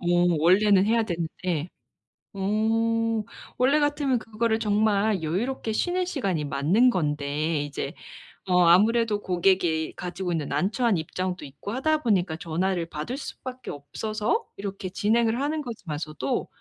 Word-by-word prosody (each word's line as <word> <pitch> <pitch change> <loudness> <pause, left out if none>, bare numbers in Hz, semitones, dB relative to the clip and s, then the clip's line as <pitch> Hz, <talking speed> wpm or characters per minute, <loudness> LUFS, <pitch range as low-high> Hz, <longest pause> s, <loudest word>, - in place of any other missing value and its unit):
어. 175 - -6 0.3
원래는 190 +4 +5
해야 230 +1 +3
되는데. 170 -2 -3 0.7
어 225 +3 +1 0.4
원래 270 +4 +4
같으면 290 -3 +1
그거를 220 0 -1
정말 210 -2 +2
여유롭게 220 +9 -2
쉬는 360 +9 0
시간이 195 - -1
맞는 155 - +3
건데 150 - 0
이제 145 -1 -4 0.5
어 180 -1 +4
아무래도 215 +5 +4
고객이 175 -3 +1
가지고 180 0 -4
있는 160 -4 -2
난처한 200 - +1
입장도 180 +3 -3
있고 145 +8 -8
하다 305 +6 0
보니까 185 -7 +1
전화를 170 +2 -1
받을 160 - -5
수 280 - -7
밖에 255 0 -7
없어서 215 - -2
이렇게 195 -1 -5
진행을 225 +5 +1
하는 300 +2 -1
거지만서도 160 - -4
200 Hz, 305 characters per minute, -26 LUFS, 170-230 Hz, 0.7 s, 원래는